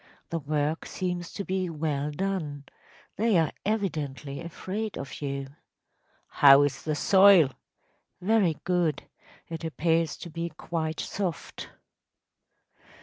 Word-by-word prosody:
The 165 Hz, -, -1 dB
work 150 Hz, +1 st, -1 dB
seems 180 Hz, -2 st, -3 dB
to 200 Hz, -, -4 dB
be 185 Hz, -1 st, -1 dB
well 150 Hz, -2 st, -2 dB
done. 150 Hz, -4 st, -3 dB, 0.5 s
They 220 Hz, -2 st, +3 dB
are 160 Hz, -3 st, +2 dB, 0.2 s
evidently 150 Hz, -, -2 dB
afraid 195 Hz, +5 st, -5 dB
of 140 Hz, -, -7 dB
you.‚ÄĚ 140 Hz, -1 st, -4 dB, 0.8 s
“How 140 Hz, 0 st, +9 dB
is 140 Hz, -1 st, -1 dB
the 155 Hz, -1 st, -2 dB
soil?‚ÄĚ 190 Hz, -5 st, +6 dB, 0.7 s
“Very 185 Hz, -4 st, +2 dB
good. 175 Hz, -3 st, +1 dB, 0.4 s
It 165 Hz, 0 st, -6 dB
appears 165 Hz, 0 st, 0 dB
to 170 Hz, -, -9 dB
be 170 Hz, +1 st, -3 dB
quite 160 Hz, 0 st, -4 dB
soft. 185 Hz, -6 st, -4 dB
165 Hz, 115 wpm, -27 LUFS, 145-185 Hz, 0.8 s, How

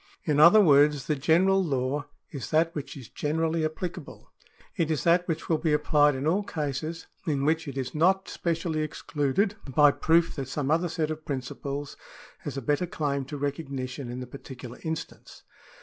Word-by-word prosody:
In 150 Hz, -2 st, +1 dB
other 170 Hz, +8 st, +8 dB
words, 145 Hz, -4 st, +5 dB
the 150 Hz, -, 0 dB
general 180 Hz, +7 st, +3 dB
law 140 Hz, -1 st, -1 dB, 0.2 s
is 140 Hz, -, -6 dB
that 165 Hz, +1 st, +2 dB
which 145 Hz, -1 st, -6 dB
is 130 Hz, -5 st, -10 dB
generally 160 Hz, +2 st, -1 dB
applicable; 160 Hz, +3 st, -5 dB, 0.4 s
it 165 Hz, -5 st, 0 dB
is 155 Hz, -4 st, 0 dB
that 175 Hz, +1 st, +3 dB
which 165 Hz, -2 st, -3 dB
will 160 Hz, -2 st, +1 dB
be 155 Hz, -1 st, +1 dB
applied 150 Hz, -1 st, +3 dB
in 130 Hz, +2 st, -3 dB
all 180 Hz, +6 st, +2 dB
cases 155 Hz, -2 st, -4 dB, 0.2 s
in 140 Hz, -3 st, 0 dB
which 160 Hz, +1 st, +1 dB
it 140 Hz, -1 st, -6 dB
is 130 Hz, -1 st, -3 dB
not 190 Hz, +5 st, +2 dB
specially 165 Hz, -2 st, -2 dB
excluded 155 Hz, +6 st, -1 dB
by 145 Hz, +2 st, +5 dB
proof 165 Hz, +3 st, +2 dB
that 135 Hz, -2 st, -3 dB
some 140 Hz, +1 st, -2 dB
other 170 Hz, +2 st, +2 dB
set 160 Hz, -1 st, -1 dB
of 155 Hz, 0 st, -6 dB
principles 140 Hz, +1 st, -5 dB, 0.4 s
has -, -, -6 dB
a 135 Hz, -, -4 dB
better 150 Hz, +7 st, 0 dB
claim 140 Hz, -5 st, -2 dB
to 145 Hz, +2 st, -6 dB
recognition 140 Hz, -3 st, -4 dB
in 125 Hz, +1 st, -5 dB
the -, -, -5 dB
particular 125 Hz, -1 st, -10 dB
instance. 160 Hz, 0 st, -6 dB
150 Hz, 180 wpm, -27 LUFS, 140-165 Hz, 0.4 s, other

